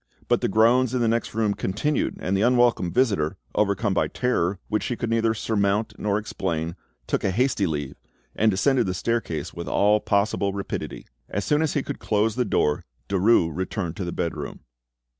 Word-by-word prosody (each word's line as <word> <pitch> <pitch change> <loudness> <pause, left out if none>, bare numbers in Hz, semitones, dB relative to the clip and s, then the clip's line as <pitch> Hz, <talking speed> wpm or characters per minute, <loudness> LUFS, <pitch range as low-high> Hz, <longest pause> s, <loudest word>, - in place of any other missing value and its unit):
But - - +2
the - - +1
groans 120 +4 +3
in - - +1
the 115 - +2
next 115 -1 -1
room 110 -2 +1
continued, 115 +11 -1
and 95 - -1
the 95 - +1
unwelcome 120 -6 +3
visitor, 100 -12 +1 0.2
overcome 100 0 +1
by - - +1
terror 100 -7 0
which 105 0 0
she 125 - -2
could 115 -1 -3
neither 115 -1 +2
surmount 105 0 0
nor 105 -1 +1
explain, 85 -6 -3 0.3
took - - -1
a - - +2
hasty 110 -1 +1
leave, 75 -3 -3 0.4
and 110 - +3
descended 120 +4 +2
the 90 - -1
staircase 110 -6 -2
with 85 0 -6
all 105 +1 +3
possible 100 -1 +1
rapidity. 100 0 -5 0.2
As 100 - -2
soon 150 +1 +2
as 160 - 0
he 145 - +1
could - - -5
close 110 +1 +1
the 125 -1 +1
door, 75 -7 +1 0.3
Derues 95 -5 +3
returned 95 -2 -3
to 95 - -3
the 85 - -3
bedroom. 85 -1 -4
105 Hz, 185 wpm, -24 LUFS, 95-115 Hz, 0.4 s, groans